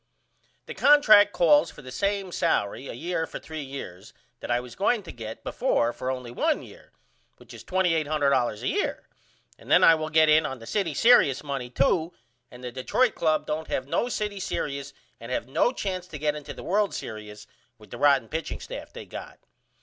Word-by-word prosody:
The - - -7
contract 215 -9 +6
calls 155 -6 +4
for 150 - -13
the 130 - -9
same 200 +5 -1
salery 130 -7 -1
a - - -6
year 165 +4 -2
for - - -7
3 160 -1 -7
years 135 -5 -9 0.3
that - - -8
I 120 0 +2
was 125 -1 -10
going 205 +2 +1
to 175 - -9
get 110 -1 -8
before 120 +1 0
for 130 - -4
only 125 -2 -4
1 - - 0
year - - -15 0.5
which - - -15
is - - -11
$2800.00 155 - +1
a - - -1
year - - -2 0.5
and - - -15
then - - +5
I 165 - +8
will 155 -1 -2
get 155 0 +4
in 155 +1 +5
on 135 -3 -4
the 115 - -12
city 170 - -1
serious 190 - +5
money 135 -4 -4
too 160 +7 +1 0.4
and 125 0 -13
the 125 - -5
Detroit 165 - +1
Club 155 -2 0
don't 155 +1 -3
have 130 - -3
no 240 +11 0
city 210 -4 -3
serious 140 -6 -4 0.3
and 115 +2 -9
have 125 - -2
no 155 - +2
chance 185 -7 -4
to 160 - -8
get 150 0 0
into 150 -1 -8
the - - -9
World's 205 +2 0
Serious 105 -1 -8 0.3
with 105 -2 -18
the 120 - -8
rotten 140 -5 +4
pitching 160 +5 -4
staff - - -8
they - - -9
got. - - -9
150 Hz, 200 wpm, -26 LUFS, 125-180 Hz, 0.5 s, I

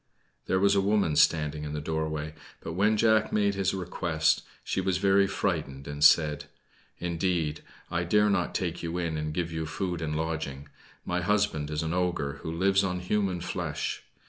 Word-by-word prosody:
There 95 - +2
was 100 +1 +4
a 100 - +3
woman 100 -6 +2
standing 75 -1 +2
in 75 0 -5
the 75 - -2
doorway; 80 0 -3 0.3
but 80 - -6
when 105 +5 +2
Jack 110 0 +3
made 100 -1 +2
his 95 -1 0
request, 85 -4 0 0.2
she 95 - -1
was 95 -1 0
very 100 0 +4
frightened, 75 -9 -2
and 75 0 -3
said 75 -1 +5 0.5
"Indeed, 85 -3 -1 0.3
I 85 0 0
dare 105 +5 +3
not 90 -3 0
take 85 -2 -2
you 85 +1 -3
in 85 -3 -2
and 75 0 -2
give 85 +1 -2
you 80 -1 -3
food 90 +1 -3
and 75 -1 -2
lodging. 80 -3 -3 0.4
My 90 0 -1
husband 90 -6 +1
is 75 +1 -2
an 80 +1 -2
ogre 85 -6 -1
who 80 - -4
lives 95 +4 +2
on 90 -2 -1
human 95 -1 -1
flesh. 90 - -3
85 Hz, 180 wpm, -28 LUFS, 80-95 Hz, 0.5 s, said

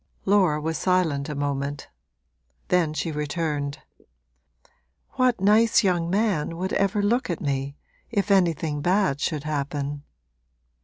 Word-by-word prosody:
Laura 190 -6 +3
was 160 +1 -3
silent 165 -7 +1
a 150 - -4
moment; 140 0 -3 0.8
then 175 -4 +2
she 155 +2 -3
returned: 150 -1 -2 1.3
'What 255 -4 +1
nice 220 +4 +4
young 175 -3 +1
man 190 -5 0
would 190 +2 -3
ever 200 +1 +1
look 235 +4 +1
at 170 - -2
me, 140 0 -3 0.3
if 205 -3 -1
anything 165 -6 +2
bad 180 -5 +1
should 150 -3 -1
happen?' 145 -1 -3
165 Hz, 120 wpm, -24 LUFS, 145-195 Hz, 1.3 s, nice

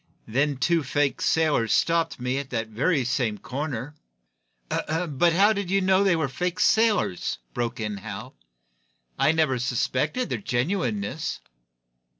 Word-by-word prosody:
Then 140 +5 0
two 170 +4 +2
fake 145 0 0
sailors 150 -9 +2
stopped 165 -4 +1
me 125 +2 -1
at 140 -2 -6
that 115 -3 -3
very 135 +5 +1
same 120 -4 0
corner 135 +2 -4 0.4
" - - -7
"How 170 +5 +3
did 200 -3 -3
you 195 +1 +3
know 190 +1 +3
they 195 -3 +3
were 160 -3 0
fake 180 +6 -3
sailors?" 220 - +2 0.2
broke 120 -1 -2
in 105 -2 -3
Hal. 95 - -8 0.9
"I - - +4
never 155 -6 +1
suspected 130 - -1
their - - -2
genuineness." 130 - -2
140 Hz, 140 wpm, -25 LUFS, 120-170 Hz, 0.9 s, I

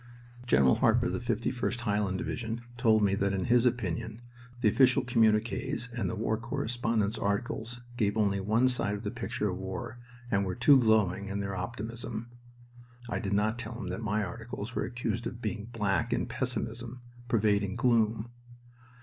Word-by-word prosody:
General 65 - +5
Harper 120 -1 +3
of - - 0
the - - -1
51st 120 +1 -1
(Highland) 105 -4 0
Division 115 +3 -3
told 110 -3 +4
me 100 -1 +3
that 100 0 +1
in 95 -2 -1
his 125 +1 +4
opinion 110 -2 -2 0.4
the 115 - +4
official 130 +5 +4
communiques 120 +2 +1
and 115 -6 -1
the 115 - -3
war 110 0 0
correspondents' 115 -2 -1
articles 110 +4 -2 0.2
gave 105 -3 +1
only 100 -2 +2
one 110 +6 +3
side 115 -5 +1
of 100 - -7
the 105 - -2
picture 115 -4 -2
of 90 - -5
war 95 +5 -5 0.3
and 100 -1 +2
were 95 -1 -2
too 130 +3 +6
glowing 105 -4 +2
in 100 +1 -3
their 100 -1 -3
optimism. 115 +3 -5 0.8
(I - - 0
did 100 -3 -2
not 110 +3 +1
tell 115 0 -5
him 95 -7 -5
that 95 +5 -4
my 105 -1 0
articles 115 +3 -6
were - - -1
accused 120 -2 -3
of 120 -1 -7
being 110 -2 -3
black 115 0 -1
in - - +1
pessimism, 120 -1 -4 0.2
pervading 105 -4 +2
gloom.) 115 -1 +2
110 Hz, 170 wpm, -30 LUFS, 100-120 Hz, 0.8 s, too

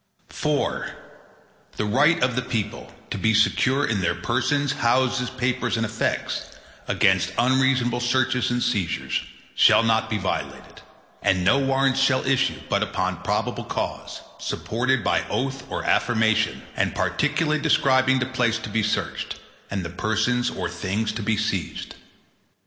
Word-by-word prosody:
IV - - -1 0.9
The 105 - -1
right 140 +9 +3
of 125 -1 +1
the 125 - +1
people 115 -4 -4 0.2
to - - -3
be 110 0 +2
secure 130 +6 +3
in 105 -4 -1
their 85 - 0
persons, 130 +9 0
houses, 125 -1 +1
papers, 125 -1 -1
and 115 - 0
effects, 110 0 -2 0.4
against - - +2
unreasonable 130 -1 +2
searches 125 +1 +1
and 120 0 0
seizures, 100 -9 -1 0.3
shall - - +5
not 110 -1 +1
be 110 - 0
violated, 95 -2 -5 0.4
and 95 -2 +2
no 135 +8 +4
Warrants 135 0 +2
shall 135 -1 +2
issue, 135 0 +1
but - - +1
upon - - -2
probable - - -2
cause, - - -4 0.2
supported 125 +1 -1
by - - +1
oath 135 0 -3
or - - -3
affirmation, 110 -2 +1
and - - 0
particularly 150 - 0
describing 130 -1 +3
the 130 - 0
place 125 -3 0
to 110 - -7
be 110 +2 0
searched, 105 - -2 0.3
and 95 -3 -3
the 85 - -5
persons 110 +6 0
or 90 - -3
things 95 +5 -2
to 115 - -5
be 110 +1 0
seized. 100 -4 -3
120 Hz, 145 wpm, -24 LUFS, 110-130 Hz, 0.9 s, shall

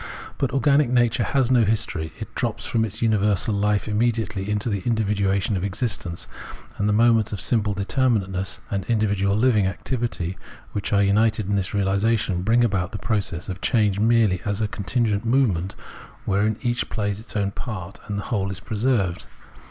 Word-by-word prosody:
But 135 - 0
organic 140 0 +3
nature 120 -2 +2
has 130 -3 +1
no 120 -2 +5
history; 100 -7 -1
it 110 0 -7
drops 120 -4 -2
from 115 -1 +1
its 110 +1 -4
universal 105 -2 +2
life 105 +1 +1
immediately 110 -2 -1
into 105 +2 -1
the 100 -4 -1
indi^dduation 100 -3 0
of 90 - -2
existence; 100 -4 -3 0.5
and 105 +1 +1
the - - +3
moments 115 0 +3
of 105 - -4
simple 105 +3 +1
determinateness 100 -3 0
and 100 -1 -1
individual 100 -3 +1
Hving 110 -3 +3
activity 95 -3 -3 0.3
which 100 - -3
are 100 -1 +4
united 105 +1 +2
in 100 - +1
this 95 -2 0
reahsation 100 -1 +1
bring 115 +4 +3
about 95 -3 0
the - - -2
process 100 -4 -2
of 95 0 -6
change 105 -4 +2
merely 110 -4 +3
as 100 -1 -2
a 110 - +1
contingent 105 0 -1
movement 115 -8 +1 0.5
wherein 105 +2 +1
each 120 -1 -1
plays 105 -2 -2
its 110 - -8
own 100 -2 0
part, 100 -5 -6
and 100 - -3
the 100 - -3
whole 100 -4 -1
is 95 -1 -5
preserved. 105 -5 -1
105 Hz, 170 wpm, -23 LUFS, 100-115 Hz, 0.5 s, no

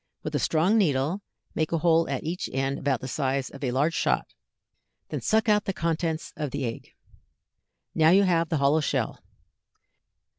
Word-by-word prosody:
With - - -4
a - - +1
strong 180 +8 +2
needle 155 +1 +1 0.3
make 155 - -1
a 165 - +1
hole 165 0 +3
at - - -2
each 170 +3 -3
end 135 +1 -1
about 135 -3 0
the 130 - -5
size 135 -1 -1
of 140 - -10
a 130 - 0
large 140 +6 +1
shot, - - +1 0.8
then - - -4
suck 220 +1 +2
out 210 -1 +3
the 195 - -1
contents 165 -2 -2
of 150 -2 -3
the 140 0 -3
egg. 115 - -7 1.0
Now 160 0 +4
you 195 +4 +6
have 170 -3 +2
the 165 - +1
hollow 140 +3 +3
shell. - - -1
160 Hz, 180 wpm, -26 LUFS, 140-170 Hz, 1.0 s, you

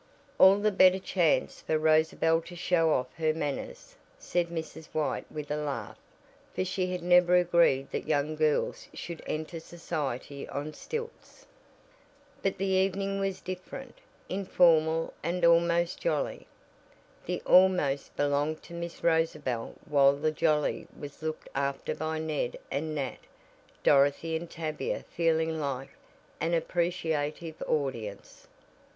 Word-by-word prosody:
"All 190 +1 +8
the 210 +1 +2
better 185 -1 +6
chance 180 -4 +1
for 155 - 0
Rosabel 160 +1 +3
to 175 +1 -10
show 170 -2 +2
off 125 -3 0
her 155 -1 +1
manners," 325 - -5 0.2
said 175 - -1
Mrs. 160 -1 -6
White 155 -2 -2
with 150 -1 -6
a - - +1
laugh, 150 -2 -4 0.6
for 185 - 0
she 185 0 -1
had 180 -1 -4
never 180 0 +5
agreed 170 -6 +3
that - - -4
young 150 0 0
girls 155 -1 0
should 170 -2 -7
enter 155 +2 -4
society 145 -5 -5
on 145 +2 -4
stilts. 460 - -7 1.0
But 195 0 0
the 195 - -1
evening 195 +1 +1
was 195 -1 -2
different, 185 +8 -8 0.3
informal 165 -4 +3
and 170 +2 0
almost 170 +1 +3
jolly. - - -1 0.8
(The - - -1
"almost" 180 -7 +4
belonged 145 +2 0
to - - -12
Miss 170 0 -6
Rosabel 160 -8 0
while 140 -2 +5
the 155 +2 0
"jolly" 155 -1 +1
was 145 +1 -9
looked 155 0 -4
after 140 0 -2
by 160 +1 -3
Ned 155 -5 -2
and 155 +3 -2
Nat, 140 -3 -3 0.6
Dorothy 145 +3 +3
and 165 +1 -4
Tavia 155 -2 -4
feeling 160 -1 +1
like 135 -2 -3 0.5
an 165 +1 +1
appreciative 165 -2 -2
audience.) 115 -9 -3
160 Hz, 130 wpm, -29 LUFS, 150-175 Hz, 1.0 s, All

